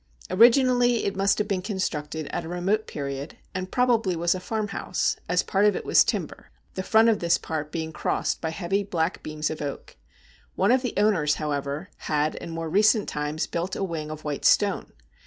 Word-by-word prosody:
Originally 245 +2 +5
it 200 - -1
must 195 +1 +2
have 210 - -1
been 195 -3 -1
constructed 160 -6 -3
at - - -3
a 165 - -7
remote 190 +5 0
period, 140 0 -5 0.2
and 185 0 -4
probably 235 -7 +2
was 170 +1 +2
a 185 - -4
farmhouse, 205 -1 -2
as 180 0 +2
part 195 +1 +1
of 210 0 +4
it - - -4
was - - +6
timber, - - -3 0.3
the 190 - -3
front 220 +4 +4
of 225 -2 +3
this 170 0 +2
part 155 -2 -4
being 160 -1 -4
crossed - - -1
by 160 - -1
heavy 190 +4 -1
black 175 -3 -2
beams 155 0 -3
of 155 - -6
oak. 140 - -6 0.6
One - - +3
of 255 0 +4
the 250 - -3
owners, 185 -8 +3
however, 145 +3 -3
had 150 0 0
in - - -7
more 165 0 -4
recent 210 +5 +3
times 150 +1 -2
built 175 +3 -3
a - - -2
wing 160 -5 -4
of 155 0 -7
white 150 -2 -4
stone. 200 -2 +3
180 Hz, 195 wpm, -25 LUFS, 155-205 Hz, 0.6 s, was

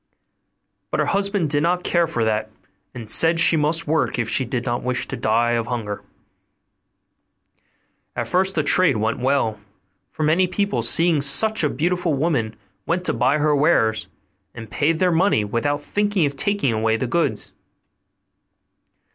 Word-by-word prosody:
But - - -3
her - - +2
husband 200 -5 -1
did 145 -1 +1
not 180 +3 0
care 170 -1 +1
for 120 -8 -2
that, 110 0 -1 0.4
and 120 -3 -9
said 165 +9 +4
she 165 - +5
must 155 +2 0
work, 160 +1 -1
if 120 -2 -2
she 130 +3 0
did 125 0 -4
not 120 -1 -2
wish 125 0 -2
to - - -5
die 115 +2 0
of 115 -1 -1
hunger. 110 -4 -4 2.1
At - - -3
first 190 +1 +1
the 155 - 0
trade 165 -5 +3
went 110 +3 -2
well; 125 -5 0 0.5
for 155 - -4
many 165 +5 +2
people, 185 - -2
seeing 160 +6 +2
such 205 +10 +4
a 150 - +2
beautiful 175 0 -1
woman, 135 -7 -1 0.3
went 180 +2 -1
to - - +1
buy 130 +4 +1
her 150 0 +1
wares, 115 -8 +1 0.5
and 115 -2 -10
paid 155 +2 0
their 180 +1 +1
money 165 - +1
without 145 +8 -2
thinking 205 -3 0
of 140 -1 -3
taking 200 - 0
away 110 0 0
the 130 - -3
goods. 165 +8 -2
145 Hz, 165 wpm, -21 LUFS, 120-170 Hz, 2.1 s, she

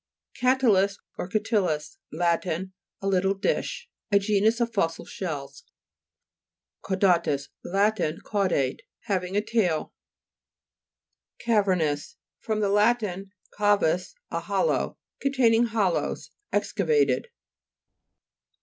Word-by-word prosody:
31). 255 +1 +4 0.3
CA'TYIUS 200 0 -12 0.2
or - - -2
CATILLUS 185 -8 -1
Lat. 170 +2 +1
A 185 +3 -3 0.3
little 195 0 +2
dish. 335 - -2 0.2
A 200 - +6
genus 210 +3 +2
of 235 -1 0
fossil 165 -6 -1
shells 140 -6 -6 1.2
(p. 190 - -1
74). 185 -3 +4
CAUDA'TUS 140 -4 -3 0.2
Lat. 205 +4 +2 0.3
Caudate; 185 -11 0 0.2
having 185 -1 -2
a - - +3
tail. 210 -8 0 1.5
CAVE'RSTOUS 185 -10 +1 0.2
fr. 220 - -2
lat. 210 +3 +3 0.5
cavus, 205 - +2 0.2
a - - -1
hol - - 0
low. - - -1 0.2
Containing 240 -4 +3
hollows; 210 -6 -1 0.2
exca - - -1
vated. 450 0 +3
195 Hz, 105 wpm, -26 LUFS, 175-220 Hz, 1.5 s, A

